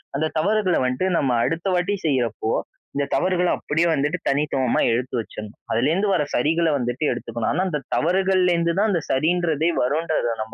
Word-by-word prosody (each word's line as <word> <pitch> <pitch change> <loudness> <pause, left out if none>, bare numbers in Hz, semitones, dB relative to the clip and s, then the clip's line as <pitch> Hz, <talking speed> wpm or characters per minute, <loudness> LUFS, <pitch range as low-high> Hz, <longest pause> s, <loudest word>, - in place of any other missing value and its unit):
அந்த 155 +3 0
தவறுகள 200 +1 +2
வன்ட்டு 125 +8 -1
நம்ம 135 -3 +1
அடுத்த 165 +4 -2
வாட்டி 180 +3 +1
செய்யிறப்போ, 125 -5 0 0.4
இந்த 140 0 0
தவறுகள 180 -1 +1
அப்பிடியே 165 +3 0
வந்துட்டு 150 0 0
தனித்துவமா 135 -3 +1
எடுத்து 125 +3 -2
வச்சிட்ணும். 105 0 -8
அதுலேருந்து 160 - +1
வர 175 - +2
சரிகள்ல 160 +5 +2
வந்துட்டு 120 +3 -3
எடுத்துக்கணும். 115 -1 -3
ஆனா 180 +4 +1
அந்த 150 -4 -2 0.2
தவறுகள்லேருந்து 180 -1 +2
தான் 215 +1 +3
அந்த 170 -4 0
சரின்றதே 160 +2 +1
வருன்றத 155 0 0 0.2
நம்ம 110 - -13
155 Hz, 155 wpm, -22 LUFS, 130-175 Hz, 0.4 s, தான்